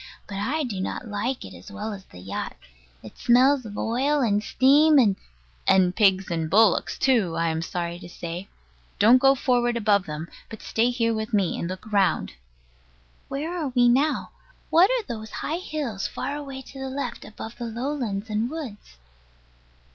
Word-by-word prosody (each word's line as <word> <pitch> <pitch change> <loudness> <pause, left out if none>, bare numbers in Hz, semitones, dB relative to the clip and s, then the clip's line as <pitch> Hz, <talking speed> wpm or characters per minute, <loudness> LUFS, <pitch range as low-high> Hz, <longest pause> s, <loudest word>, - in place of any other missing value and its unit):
But 200 - -6
I 290 +10 -1
do 210 -8 -3
not 230 - -4
like 225 +5 -3
it - - -10
as - - -12
well 210 +1 -5
as 195 -1 -10
the - - -15
yacht. 95 +2 -5 0.5
It - - -12
smells 255 +1 +4
of 205 - -8
oil 275 +6 +1
and 210 -4 +2
steam, 290 +7 +5
and 215 -7 +5 0.5
And 185 -1 +4
pigs 190 -3 +3
and 165 -2 -1
bullocks 210 +1 +3
too, 230 -11 +2
I 165 0 +1
am 160 0 -1
sorry 170 0 -4
to 175 - -11
say. 175 +2 -6 0.5
Don't 235 +5 +6
go 270 +1 +5
forward 240 -2 +1
above 205 -4 +2
them, 155 +2 -5 0.2
but 220 - -10
stay 230 +2 +1
here 230 -2 +1
with 220 +1 -2
me, 195 -4 +1
and 170 - -3
look 190 +4 -8
round. 195 - +2 1.0
Where 310 +6 -4
are 325 -5 -2
we 245 -1 +5
now? 275 +6 +2 0.4
What 350 +4 +6
are - - +1
those 220 - -6 0.2
high 320 +3 -1
hills, 285 - -3
far 285 - -4
away 275 -2 -7
to 270 - -12
the 265 0 -4
left, 260 -3 -4
above 220 +2 -9
the 240 - -3
lowlands 230 -4 -3
and 215 +2 -1
woods? 260 - -8
225 Hz, 180 wpm, -25 LUFS, 195-270 Hz, 1.0 s, Don't